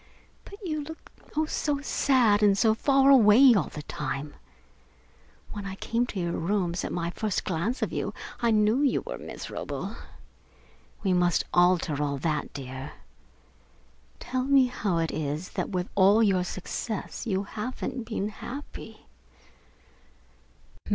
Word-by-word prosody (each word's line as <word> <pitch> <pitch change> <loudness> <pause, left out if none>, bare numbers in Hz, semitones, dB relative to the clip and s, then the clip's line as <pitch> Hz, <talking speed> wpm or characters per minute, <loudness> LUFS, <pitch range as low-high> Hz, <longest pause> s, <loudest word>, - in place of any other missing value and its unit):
But 400 - -10
you 310 -3 -2
look 320 +2 -11 0.3
oh, 310 - +3
so 295 -2 -1
sad 250 -7 +3
and 200 -2 +4
so 220 +1 +4
far 275 +4 +4
away 245 +1 +8
all 195 -8 +1
the 150 - -8
time! 145 0 -4 1.2
When 205 -1 -6
I 190 - -5
came 235 +4 -1
to 205 - -5
your 170 -1 -1
rooms, 175 0 -1
at - - -3
my 170 -1 -2
first 210 +1 -2
glimpse 190 +9 -1
of - - -2
you - - -2 0.3
I 235 - +3
knew 215 +2 +3
that 290 - +4
you - - 0
were - - -7
miserable. - - -6 1.1
We 190 -3 +2
must 175 -1 +2
alter 175 -4 +3
all 140 -1 -1
that, 150 +1 -2
dear. 130 0 -7 1.3
Tell 255 0 -2
me 275 -1 +5
how 210 -7 -1
it 165 -1 0
is 155 +3 -3
that - - -3
with 180 -1 -2
all 200 +3 +5
your 190 -4 +3
success 205 +6 -5
you 195 -2 0
haven't 245 +3 -5
been 215 -3 -2
happy?" 265 +6 -9
205 Hz, 145 wpm, -27 LUFS, 175-245 Hz, 1.3 s, away